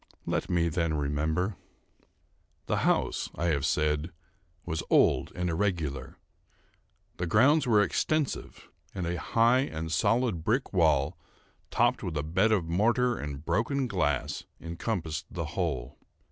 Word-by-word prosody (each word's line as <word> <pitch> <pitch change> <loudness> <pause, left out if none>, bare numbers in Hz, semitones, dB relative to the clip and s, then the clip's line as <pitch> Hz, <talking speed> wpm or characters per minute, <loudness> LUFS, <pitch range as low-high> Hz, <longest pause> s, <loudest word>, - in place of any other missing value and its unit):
Let - - -2
me 85 -1 +2
then 85 -1 0
remember. 80 +6 -1 1.1
The - - 0
house, - - +1
I 85 +2 0
have 70 -4 +1
said, 75 +2 0 0.5
was 80 -2 -2
old - - +3
and 90 0 -2
irregular. 80 -7 -2 1.0
The 90 - -2
grounds 130 - +4
were 105 -3 +5
extensive, 155 +5 -2 0.3
and 90 -3 -2
a 85 0 -2
high 115 +6 +3
and 80 - -3
solid 105 0 +1
brick 120 +7 0
wall, 80 -2 +2 0.5
topped - - +2
with 80 -4 -3
a 75 - -1
bed 95 +8 +2
of 100 -6 +2
mortar 120 +8 +2
and 75 0 -6
broken 115 +10 0
glass, 80 - -1 0.2
encompassed 85 -1 -4
the - - -4
whole. - - -3
85 Hz, 130 wpm, -29 LUFS, 80-110 Hz, 1.1 s, were